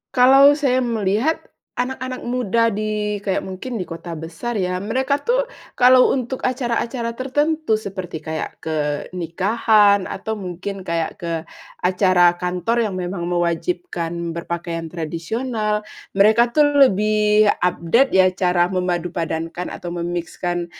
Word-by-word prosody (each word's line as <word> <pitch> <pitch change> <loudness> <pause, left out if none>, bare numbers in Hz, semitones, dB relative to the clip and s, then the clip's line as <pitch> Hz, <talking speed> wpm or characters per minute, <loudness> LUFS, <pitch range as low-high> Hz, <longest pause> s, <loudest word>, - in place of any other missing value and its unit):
Kalau 270 +3 +7
saya 270 -4 +1
melihat 230 +4 0 0.3
anak-anak 255 0 -3
muda 240 -2 0
di 210 -1 -2
kayak 195 -2 -1
mungkin 190 +6 -6
di 185 - -3
kota 165 0 -7
besar 170 +9 -5
ya, 180 -1 -1
mereka 260 +6 0
tuh - - +1 0.3
kalau 255 0 +6
untuk 260 0 -2
acara-acara 240 -1 -2
tertentu, 290 0 0
seperti 185 -5 -6
kayak 155 0 -5
ke 160 -1 -1 0.4
nikahan 200 +3 +2
atau 220 +3 -4
mungkin 195 0 -6
kayak 170 -2 -3
ke 170 -1 -3 0.5
acara 180 -1 +4
kantor 180 +6 0
yang 185 - -5
memang 175 -1 -3
mewajibkan 170 - -2
berpakaian 170 -1 -4
tradisional, 210 +7 -3 0.3
mereka 220 +4 +5
tuh 300 +4 +4 0.2
lebih 210 +1 +3 0.2
update 180 +9 +2
ya, 185 -1 +4
cara 180 -2 +2
memadupadankan 175 -1 -2
atau 175 0 -6
me-mix-kan, 175 0 -3
195 Hz, 120 wpm, -21 LUFS, 175-240 Hz, 0.5 s, Kalau